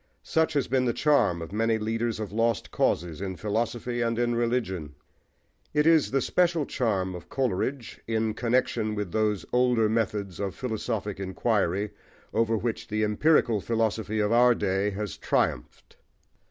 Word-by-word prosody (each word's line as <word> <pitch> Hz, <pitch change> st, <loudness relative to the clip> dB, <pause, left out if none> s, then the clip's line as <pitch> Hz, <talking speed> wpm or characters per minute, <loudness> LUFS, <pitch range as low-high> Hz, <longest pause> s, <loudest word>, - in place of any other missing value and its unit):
Such 160 Hz, 0 st, +1 dB
has 140 Hz, -3 st, +1 dB
been 130 Hz, 0 st, +1 dB
the 120 Hz, -, +1 dB
charm 140 Hz, -, +3 dB
of 80 Hz, -, -9 dB
many 115 Hz, +2 st, +1 dB
leaders 115 Hz, +1 st, -2 dB
of 105 Hz, -2 st, -4 dB
lost 115 Hz, +1 st, 0 dB
causes 85 Hz, 0 st, 0 dB
in 95 Hz, -1 st, -3 dB
philosophy 120 Hz, +5 st, -2 dB
and 115 Hz, -1 st, 0 dB
in 120 Hz, 0 st, +1 dB
religion. 115 Hz, -, -1 dB, 0.8 s
It 150 Hz, 0 st, +3 dB
is 165 Hz, -2 st, +5 dB
the 135 Hz, 0 st, +1 dB
special 170 Hz, -2 st, +2 dB
charm 100 Hz, -9 st, -1 dB
of 90 Hz, -, -9 dB
Coleridge, 130 Hz, 0 st, -2 dB
in 110 Hz, -1 st, 0 dB
connexion 115 Hz, -2 st, 0 dB
with 105 Hz, -4 st, -3 dB
those 105 Hz, -1 st, 0 dB
older 125 Hz, -3 st, +3 dB
methods 105 Hz, -4 st, -1 dB
of 100 Hz, -2 st, -3 dB
philosophic 110 Hz, -4 st, -3 dB
inquiry, 100 Hz, 0 st, 0 dB, 0.4 s
over 115 Hz, 0 st, +2 dB
which 115 Hz, +1 st, -3 dB
the 110 Hz, 0 st, -1 dB
empirical 110 Hz, 0 st, +3 dB
philosophy 110 Hz, -1 st, -1 dB
of 105 Hz, 0 st, +1 dB
our 120 Hz, +1 st, +5 dB
day 100 Hz, 0 st, 0 dB
has 105 Hz, 0 st, -5 dB
triumphed. -, -, -2 dB
110 Hz, 155 wpm, -27 LUFS, 105-120 Hz, 0.8 s, is